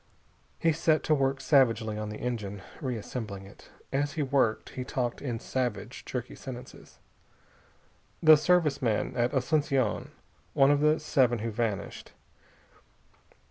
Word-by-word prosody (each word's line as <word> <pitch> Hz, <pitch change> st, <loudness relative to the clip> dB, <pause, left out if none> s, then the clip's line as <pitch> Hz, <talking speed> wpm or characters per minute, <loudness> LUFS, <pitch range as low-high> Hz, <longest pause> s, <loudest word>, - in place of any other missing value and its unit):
He 165 Hz, -, +2 dB
set 155 Hz, 0 st, +2 dB
to 155 Hz, -, +2 dB
work 135 Hz, -2 st, +1 dB
savagely 115 Hz, -7 st, +3 dB
on 105 Hz, 0 st, -4 dB
the 105 Hz, -, -6 dB
engine, 105 Hz, -5 st, -4 dB, 0.2 s
reassembling 110 Hz, -5 st, -5 dB
it. 100 Hz, -, -16 dB, 0.2 s
As 145 Hz, +1 st, 0 dB
he 155 Hz, -, -1 dB
worked, 130 Hz, -5 st, +1 dB
he 130 Hz, -, -5 dB
talked 125 Hz, -2 st, -3 dB
in 120 Hz, -5 st, -3 dB
savage, 125 Hz, -2 st, -3 dB
jerky 125 Hz, -1 st, -5 dB
sentences. 125 Hz, -1 st, -10 dB, 1.3 s
"The 155 Hz, -1 st, +9 dB
Service 155 Hz, -2 st, +2 dB
man 115 Hz, -4 st, 0 dB
at 120 Hz, 0 st, +1 dB
Asunción. 135 Hz, -4 st, +1 dB, 0.5 s
One 135 Hz, +1 st, +6 dB
of 145 Hz, -, +3 dB
the 150 Hz, +1 st, +3 dB
seven 130 Hz, -6 st, +2 dB
who 115 Hz, +1 st, -3 dB
vanished. 110 Hz, -2 st, -3 dB
130 Hz, 135 wpm, -29 LUFS, 115-145 Hz, 1.3 s, The